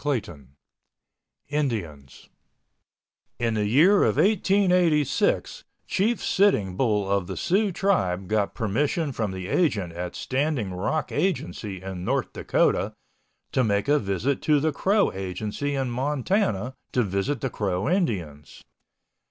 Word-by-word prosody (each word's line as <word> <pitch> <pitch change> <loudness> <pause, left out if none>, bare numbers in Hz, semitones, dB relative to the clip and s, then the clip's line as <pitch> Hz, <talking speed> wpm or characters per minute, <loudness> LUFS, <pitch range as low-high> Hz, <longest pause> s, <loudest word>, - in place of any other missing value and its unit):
CHAPTER 145 -4 +1
XIII 70 -6 -15 1.0
INDIANS 100 - -3 1.1
In 115 -1 0
the 105 -1 0
year 165 - +5
of - - +2
1886 180 - +2 0.2
Chief 220 +4 0
Sitting 110 - +2
Bull 105 -3 +1
of 100 -2 0
the - - -5
Sioux 200 +3 +1
tribe 95 - 0
got 105 -1 0
permission 140 - 0
from 110 -5 -2
the 95 -1 -6
agent 100 - 0
at 90 +1 -5
Standing 130 -7 -1
Rock 150 +13 -2
Agency 100 - -2
in 95 -2 -6
North - - -1
Dakota - - +1 0.6
to 130 - +2
make 100 -1 0
a 145 +1 +4
visit 100 +7 -1
to 150 -2 +3
the 155 +2 +1
Crow 200 +7 +2
Agency 105 +9 -3
in 135 -2 -1
Montana 130 - 0 0.2
to 125 - +2
visit 100 +7 -2
the 135 - -2
Crow 95 -1 -2
Indians. 90 - -2
120 Hz, 130 wpm, -25 LUFS, 95-155 Hz, 1.1 s, year